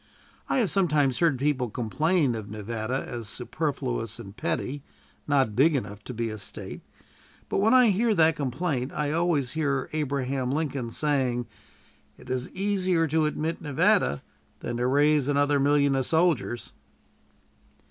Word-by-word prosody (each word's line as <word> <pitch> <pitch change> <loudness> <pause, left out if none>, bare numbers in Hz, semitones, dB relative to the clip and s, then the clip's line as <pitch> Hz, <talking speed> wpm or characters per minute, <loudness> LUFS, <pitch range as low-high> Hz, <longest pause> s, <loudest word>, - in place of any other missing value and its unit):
I - - +1
have 220 -10 +2
sometimes 150 -9 +2
heard 165 -6 +3
people 135 -2 0
complain 140 - +1
of 110 -3 -6
Nevada 110 +4 -3
as 115 -4 -6
superfluous - - -3
and 100 +1 -10
petty, 125 - -2 0.5
not 135 -7 +2
big 145 +6 +4
enough 105 -6 -4
to 125 - -6
be 115 0 -2
a 110 - -7
State; 100 - -7 0.7
but - - 0
when 220 +5 +4
I 250 -3 +6
hear 220 +3 +2
that 160 -2 +4
complaint, 135 -1 -2
I 150 -1 -1
always 160 -6 +1
hear 140 -4 -1
Abraham 135 -3 -1
Lincoln 140 -5 -2
saying, 130 -3 0 0.7
"It - - -10
is 130 0 -2
easier 185 -3 +1
to 155 +1 +2
admit 155 +2 -3
Nevada 70 - +2 0.4
than 120 - -3
to 125 +1 0
raise 145 +1 +3
another 145 0 +2
million 140 0 +3
of 130 -2 0
soldiers." 160 -8 +1
140 Hz, 145 wpm, -26 LUFS, 125-160 Hz, 0.7 s, I